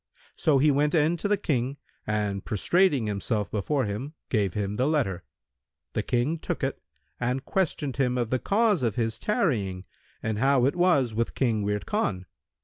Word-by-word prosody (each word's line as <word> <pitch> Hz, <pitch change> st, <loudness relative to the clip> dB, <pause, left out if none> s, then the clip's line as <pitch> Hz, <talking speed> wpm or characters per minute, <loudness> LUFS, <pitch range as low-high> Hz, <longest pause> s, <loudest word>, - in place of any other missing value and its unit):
So 150 Hz, -3 st, +3 dB
he 145 Hz, +3 st, +4 dB
went 145 Hz, +4 st, +2 dB
in 160 Hz, +2 st, +3 dB
to 185 Hz, -, -2 dB
the 205 Hz, 0 st, +2 dB
King 135 Hz, -7 st, -1 dB, 0.3 s
and 105 Hz, -2 st, -1 dB
prostrating 145 Hz, -, +2 dB
himself 105 Hz, -1 st, -2 dB
before 130 Hz, +6 st, 0 dB
him, 120 Hz, +10 st, -5 dB
gave 100 Hz, -6 st, 0 dB
him 105 Hz, 0 st, -2 dB
the 130 Hz, -, +2 dB
letter. 135 Hz, -, 0 dB, 0.7 s
The -, -, 0 dB
King 130 Hz, +7 st, 0 dB
took -, -, -4 dB
it -, -, -2 dB, 0.4 s
and 125 Hz, +2 st, -1 dB
questioned 155 Hz, -7 st, -1 dB
him 125 Hz, -2 st, +1 dB
of 120 Hz, -2 st, -1 dB
the 130 Hz, -, +2 dB
cause 210 Hz, -, +2 dB
of 115 Hz, -5 st, 0 dB
his 115 Hz, -1 st, -1 dB
tarrying 110 Hz, -, 0 dB, 0.4 s
and 110 Hz, -1 st, -1 dB
how 135 Hz, 0 st, +4 dB
it 140 Hz, -, +1 dB
was 160 Hz, -10 st, +3 dB
with 115 Hz, +1 st, -1 dB
King 115 Hz, -5 st, +1 dB
Wird 105 Hz, 0 st, -1 dB
Khan. 110 Hz, -, -1 dB
125 Hz, 175 wpm, -27 LUFS, 105-150 Hz, 0.7 s, he